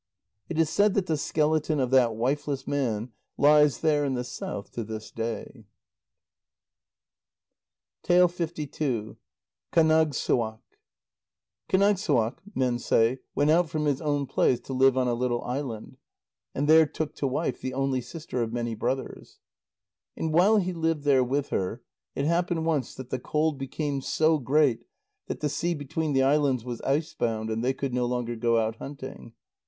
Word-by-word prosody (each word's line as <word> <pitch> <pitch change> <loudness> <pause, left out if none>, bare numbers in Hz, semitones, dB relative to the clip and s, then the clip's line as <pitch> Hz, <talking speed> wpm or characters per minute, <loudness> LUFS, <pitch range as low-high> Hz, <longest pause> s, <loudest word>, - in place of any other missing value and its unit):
It 165 - -4
is 160 -1 +2
said 205 0 +3
that 195 - +1
the 160 - 0
skeleton 155 0 0
of 130 -1 0
that 125 -4 +4
wifeless 135 +3 -1
man 120 -5 -1 0.3
lies 150 0 +5
there 150 -2 +2
in 135 -2 -1
the 125 - -2
south 105 -4 -6
to 115 - -4
this 110 0 -7
day. 115 0 -5 2.4
KÁNAGSSUAQ 160 -9 0 2.5
Kánagssuaq, 190 - +2 0.2
men 125 -2 +1
say, 115 +2 +2 0.2
went 145 +1 +3
out 170 0 +3
from 150 +1 -2
his 145 -1 0
own 145 -2 0
place 125 -1 +2
to 135 - -7
live 130 0 +4
on 130 -1 +2
a 120 - +1
little 120 0 -1
island, 125 -4 -5 0.6
and 145 +2 0
there 160 0 +7
took 155 0 -4
to 140 - 0
wife 135 0 -2
the 130 0 -4
only 135 -1 0
sister 155 -2 -5
of 115 -1 -2
many 120 -1 -2
brothers. 130 +4 -4 0.8
And 160 -1 -2
while 195 +7 +5
he 185 -2 0
lived 165 -3 -1
there 135 -3 +4
with 140 +3 -1
her, 95 +6 -2 0.3
it 140 - -1
happened 170 0 0
once 150 -7 -1
that 130 -1 -9
the 130 - -1
cold 150 +2 0
became 140 +1 -3
so 155 +3 +2
great 135 -2 +2 0.4
that - - -5
the 150 - +1
sea 170 +4 -1
between 150 +1 -3
the 135 0 +3
islands 135 -3 +2
was 120 -2 -5
icebound, 135 -7 -1
and 110 +1 -2
they 130 +2 +1
could 135 -1 -4
no 125 -1 0
longer 120 -1 -2
go 115 0 +1
out 110 0 0
hunting. 135 -4 -9
135 Hz, 155 wpm, -27 LUFS, 125-155 Hz, 2.5 s, there